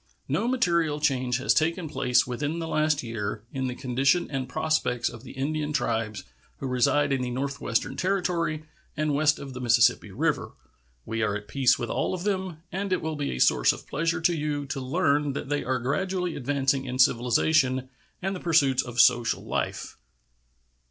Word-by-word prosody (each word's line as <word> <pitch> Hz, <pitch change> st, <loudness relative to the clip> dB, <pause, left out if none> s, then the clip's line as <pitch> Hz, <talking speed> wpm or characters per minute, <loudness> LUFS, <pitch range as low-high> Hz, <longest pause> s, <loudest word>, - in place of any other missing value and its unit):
No 230 Hz, -, 0 dB
material 170 Hz, -12 st, +1 dB
change 130 Hz, -4 st, +1 dB
has 130 Hz, +2 st, +2 dB
taken 165 Hz, +2 st, 0 dB
place 125 Hz, -4 st, +2 dB
within 145 Hz, +6 st, -3 dB
the 165 Hz, -1 st, -3 dB
last 155 Hz, -2 st, +1 dB
year 110 Hz, -2 st, -4 dB
in 130 Hz, -1 st, -2 dB
the 125 Hz, -, -4 dB
condition 135 Hz, +6 st, +1 dB
and 130 Hz, -2 st, -3 dB
prospects 125 Hz, -4 st, 0 dB
of 115 Hz, -2 st, -11 dB
the 130 Hz, -, -10 dB
Indian 150 Hz, +2 st, -2 dB
tribes 110 Hz, -6 st, -1 dB, 0.3 s
who -, -, -6 dB
reside 135 Hz, +3 st, +2 dB
in 135 Hz, -, 0 dB
the 125 Hz, -, -2 dB
Northwestern 135 Hz, -2 st, -2 dB
Territory 175 Hz, -5 st, -1 dB, 0.3 s
and 155 Hz, -1 st, 0 dB
west 150 Hz, +1 st, +3 dB
of 135 Hz, -1 st, -8 dB
the 130 Hz, -, -7 dB
Mississippi 120 Hz, -1 st, +3 dB
River. -, -, -1 dB, 0.5 s
We 115 Hz, 0 st, -3 dB
are 105 Hz, -2 st, 0 dB
at 105 Hz, 0 st, -6 dB
peace 135 Hz, 0 st, +3 dB
with 120 Hz, -, -4 dB
all -, -, -1 dB
of 180 Hz, -, -6 dB
them, 190 Hz, -5 st, -2 dB
and 195 Hz, +1 st, -3 dB
it 185 Hz, -, 0 dB
will 160 Hz, 0 st, -2 dB
be 145 Hz, -1 st, -2 dB
a -, -, -5 dB
source -, -, +4 dB
of -, -, -11 dB
pleasure 165 Hz, +2 st, -1 dB
to 170 Hz, +1 st, +2 dB
you 145 Hz, -2 st, -2 dB
to 135 Hz, 0 st, -4 dB
learn 145 Hz, 0 st, +1 dB
that 140 Hz, -, -5 dB
they 145 Hz, 0 st, 0 dB
are 130 Hz, 0 st, 0 dB
gradually 180 Hz, +7 st, -1 dB
advancing 135 Hz, 0 st, 0 dB
in 130 Hz, 0 st, -4 dB
civilization 130 Hz, +1 st, +3 dB, 0.4 s
and 195 Hz, +1 st, -1 dB
the -, -, -5 dB
pursuits 140 Hz, -7 st, +3 dB
of 120 Hz, -1 st, -6 dB
social 120 Hz, 0 st, +4 dB
life. -, -, -3 dB
140 Hz, 185 wpm, -26 LUFS, 125-160 Hz, 0.5 s, source